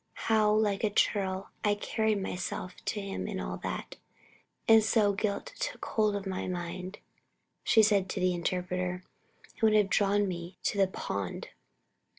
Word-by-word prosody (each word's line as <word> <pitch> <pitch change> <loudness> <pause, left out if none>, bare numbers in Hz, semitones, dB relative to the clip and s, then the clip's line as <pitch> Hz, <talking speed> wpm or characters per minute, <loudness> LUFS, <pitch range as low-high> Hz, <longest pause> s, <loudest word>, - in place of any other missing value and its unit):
How 215 -1 +4
like 210 -2 +2
a 215 - +3
churl 195 -2 0
I 205 -1 +3
carried 220 0 0
myself 180 0 -4
to 210 - -1
him 195 -1 -4
in - - -3
all - - -4
that! - - -5 0.7
And 225 -1 +7
so 210 -2 +3
guilt 200 0 -2
took - - -3
hold 215 -2 +1
of 200 -1 -4
my 190 -1 -3
mind," 180 +2 -5 0.7
she 220 - +5
said 200 -3 +3
to - - -3
the 185 0 +2
Interpreter, 180 +1 -2 0.5
"and - - -21
would 220 -1 +5
have 205 -3 +3
drawn 205 +1 +3
me 175 0 -6
to 200 - 0
the 195 - +5
pond!" 100 - -4
200 Hz, 160 wpm, -30 LUFS, 185-210 Hz, 0.7 s, And